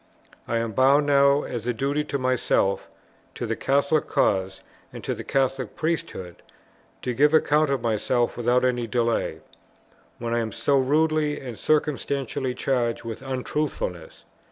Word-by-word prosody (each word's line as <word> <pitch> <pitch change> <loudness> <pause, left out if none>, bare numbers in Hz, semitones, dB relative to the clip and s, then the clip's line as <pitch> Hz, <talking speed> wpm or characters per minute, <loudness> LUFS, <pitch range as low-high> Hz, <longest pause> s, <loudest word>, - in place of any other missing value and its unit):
I 115 - 0
am 115 -1 -1
bound 135 +6 +4
now 140 0 +4
as 120 -1 -5
a 125 - +1
duty 140 +5 0
to 140 - -2
myself, 130 -6 +1 0.5
to - - -4
the - - -1
Catholic 140 +3 +1
cause, 95 -1 0 0.4
to - - -3
the - - -7
Catholic 135 -3 -1
Priesthood, 160 - -3 0.7
to 125 - -1
give 150 +5 +4
account 150 -1 +3
of 135 -3 -1
myself 120 +2 0
without 125 +1 +2
any 120 -2 0
delay, 115 0 -1 0.8
when 115 0 -3
I 120 - +2
am 110 -1 -2
so 140 -1 +2
rudely 150 +2 +1
and 125 -3 -7
circumstantially 140 -3 -1
charged 120 -4 -1
with 115 0 -6
Untruthfulness. 135 - -4
130 Hz, 145 wpm, -25 LUFS, 115-145 Hz, 0.8 s, bound